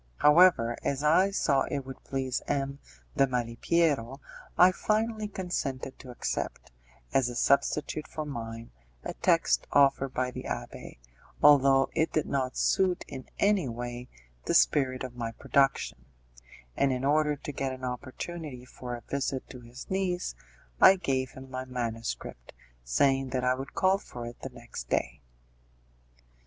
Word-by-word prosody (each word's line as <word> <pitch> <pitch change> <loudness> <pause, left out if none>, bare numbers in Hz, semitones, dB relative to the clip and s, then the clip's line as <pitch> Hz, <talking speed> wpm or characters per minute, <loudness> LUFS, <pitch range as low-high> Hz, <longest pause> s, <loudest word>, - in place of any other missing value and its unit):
However, 150 -7 +5
as 140 +1 -1
I 165 +6 +5
saw 140 -8 +2
it 140 -2 -3
would 135 -1 -10
please 130 -1 -2
M. 140 -1 -1 0.4
de 135 - +5
Malipiero, 125 +2 0 0.4
I 180 +1 +8
finally 215 +2 -1
consented 155 -10 -4
to 130 - -11
accept, 125 - -4 0.4
as 130 -2 +3
a 120 - -6
substitute 150 +4 +1
for 155 - -5
mine, 115 -4 -6 0.3
a - - -4
text - - +2
offered 135 -1 +4
by 130 0 -1
the - - -7
abbé, - - -6 0.5
although 135 -2 +6
it 160 0 +1
did 155 - 0
not 130 -2 -2
suit 185 -1 +2
in 130 -3 -9
any 200 -9 +2
way 120 +1 -6 0.4
the - - 0
spirit 130 - +3
of 125 -1 -7
my 115 -1 -4
production; 135 - +1 0.7
and 140 - +2
in 130 +1 -2
order 150 +1 +3
to 145 - -7
get 135 -1 -2
an 130 0 -8
opportunity 130 +2 -6
for 125 -1 -7
a 120 - -9
visit 135 +1 -3
to 125 - -9
his 120 +2 -11
niece, 185 - -1 0.5
I 190 - +9
gave 135 -8 -1
him 130 0 -10
my 130 0 -4
manuscript, 115 - -5 0.3
saying 135 - +2
that 125 0 -2
I 125 0 +3
would 135 +2 -7
call 190 +1 +3
for 120 -11 -8
it 120 0 -9
the - - -5
next - - -9
day. 60 +3 -1
135 Hz, 150 wpm, -29 LUFS, 125-150 Hz, 0.7 s, I